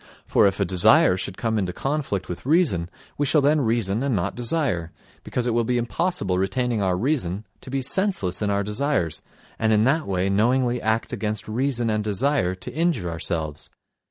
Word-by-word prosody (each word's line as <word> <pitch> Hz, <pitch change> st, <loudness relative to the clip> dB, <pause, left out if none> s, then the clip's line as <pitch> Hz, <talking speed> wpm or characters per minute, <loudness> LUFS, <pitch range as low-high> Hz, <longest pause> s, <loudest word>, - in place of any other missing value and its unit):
For -, -, +4 dB
if 100 Hz, -, -1 dB
a 100 Hz, -, +2 dB
desire 90 Hz, 0 st, +5 dB
should 95 Hz, 0 st, -5 dB
come 110 Hz, -2 st, 0 dB
into 90 Hz, -3 st, -2 dB
conflict 135 Hz, -9 st, -2 dB
with 90 Hz, -, -6 dB
reason 135 Hz, -, +2 dB, 0.3 s
we 145 Hz, -, +1 dB
shall 150 Hz, -, +4 dB
then 145 Hz, +2 st, +3 dB
reason 110 Hz, -3 st, 0 dB
and 135 Hz, -3 st, 0 dB
not 85 Hz, -, -1 dB
desire, 120 Hz, -, -1 dB, 0.3 s
because 125 Hz, -, -2 dB
it 120 Hz, -, 0 dB
will 120 Hz, 0 st, +2 dB
be 125 Hz, +2 st, 0 dB
impossible 120 Hz, -, -1 dB
retaining 115 Hz, +4 st, 0 dB
our 95 Hz, -2 st, +1 dB
reason 110 Hz, -, -1 dB, 0.2 s
to -, -, -10 dB
be 135 Hz, 0 st, -2 dB
senseless 140 Hz, -, 0 dB
in 105 Hz, -, 0 dB
our 100 Hz, 0 st, +1 dB
desires, 105 Hz, -, -1 dB, 0.4 s
and 110 Hz, 0 st, +2 dB
in 105 Hz, 0 st, +4 dB
that 150 Hz, +6 st, +1 dB
way 95 Hz, -1 st, 0 dB
knowingly 120 Hz, +5 st, +2 dB
act 110 Hz, +3 st, -1 dB
against 110 Hz, -2 st, -3 dB
reason 120 Hz, 0 st, -1 dB
and 105 Hz, 0 st, 0 dB
desire 105 Hz, -2 st, +1 dB
to 90 Hz, -, -6 dB
injure 150 Hz, -, 0 dB
ourselves. 80 Hz, -2 st, -3 dB
110 Hz, 185 wpm, -23 LUFS, 95-135 Hz, 0.4 s, desire